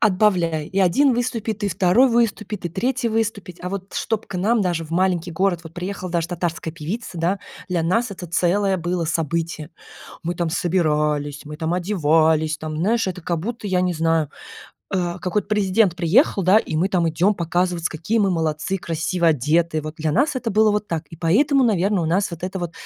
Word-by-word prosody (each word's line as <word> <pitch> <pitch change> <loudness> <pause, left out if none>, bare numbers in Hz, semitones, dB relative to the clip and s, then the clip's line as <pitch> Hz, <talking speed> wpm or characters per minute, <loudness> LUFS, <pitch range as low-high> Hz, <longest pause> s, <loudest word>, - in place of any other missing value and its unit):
отбавляй, 180 -7 +2
и 190 - -3
1 240 +9 +4
выступит, 230 -3 -2
и - - +1
2 185 +8 +4
выступить, 215 -4 0
и - - -3
3 245 +8 -1
выступит. 215 -5 -2
А 180 - -3
вот 195 0 -6
чтоб 225 -1 -2
к - - -10
нам, 220 +5 +2
даже 175 -4 -1
в 155 - -13
маленький 175 0 +1
город, 185 0 +1
вот 165 - -10
приехала 185 +1 -5
даже 170 -1 -1
татарская 170 -2 -3
певица, 180 +7 -5
да, 175 +4 0 0.3
для 175 -2 +1
нас 225 +8 +1
это 185 -2 -7
целое 190 +4 +1
было 175 -1 -2
событие. 160 0 -2 0.5
Мы 175 +1 -2
там 170 -1 -1
собирались, 150 -4 0
мы 150 0 -7
там 160 +2 -2
одевались, 160 -4 +2
там 155 -1 -5
знаешь, 215 +8 +1
это 180 -1 -4
как 170 -1 -2
будто 225 +3 -5
я 185 -2 +1
не 180 -1 0
знаю, 165 -2 +1 0.6
э, 175 -1 -1
какой-то 185 +4 -1
президент 205 -2 +2
приехал, 195 - +3
да 185 +3 +5
и 160 - -4
мы 175 +5 +2
там 180 -4 +1
идем 180 +6 +2
показываться, 175 0 -1
какие 170 +8 -1
мы 200 -3 +3
молодцы, 160 +2 -1
красиво 170 +1 -1
одетые. 155 +2 +1
Вот 155 +1 -7
для 155 0 -1
нас 280 +3 +2
это 245 -3 -2
было 215 +1 +4
вот 210 0 -1
так 165 -1 -2
и 165 - -10
поэтому, 260 - +3
наверно, 200 -3 +2
у 165 - -1
нас 185 +5 +1
вот 170 -1 -8
это 190 +1 -4
вот. 175 -2 -4
180 Hz, 195 wpm, -22 LUFS, 165-205 Hz, 0.6 s, да